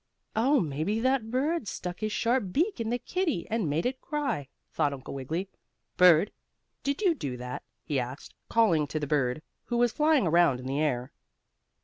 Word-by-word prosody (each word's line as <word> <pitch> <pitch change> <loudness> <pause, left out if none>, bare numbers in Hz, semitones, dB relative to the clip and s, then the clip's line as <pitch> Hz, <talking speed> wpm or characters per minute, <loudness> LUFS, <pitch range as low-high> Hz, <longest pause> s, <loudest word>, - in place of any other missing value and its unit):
"Oh, 260 +6 +4
maybe 160 - -1
that 255 -2 +1
bird 270 +2 0
stuck 180 -1 -5
his 215 0 -2
sharp 230 -2 +1
beak 340 - +1
in 225 -1 -1
the 240 - +1
kittie 330 - -1
and 220 -8 0
made 155 +4 0
it 260 +1 -2
cry," 275 - -2 0.3
thought 145 - +1
Uncle 135 -1 -7
Wiggily. 155 +8 -3 0.5
"Bird, 180 0 +6 0.5
did 280 +8 -1
you 365 -4 +5
do 140 - -4
that?" 125 +1 -5 0.2
he 145 -3 -1
asked, 125 +3 -6 0.2
calling 170 -10 +3
to 155 - -3
the 150 - -2
bird, 140 -1 0 0.2
who 240 - -1
was 240 -1 +3
flying 300 -6 +3
around 170 -5 +4
in 130 - -9
the 135 +3 -1
air. 130 -4 -1
185 Hz, 180 wpm, -28 LUFS, -, 0.5 s, Bird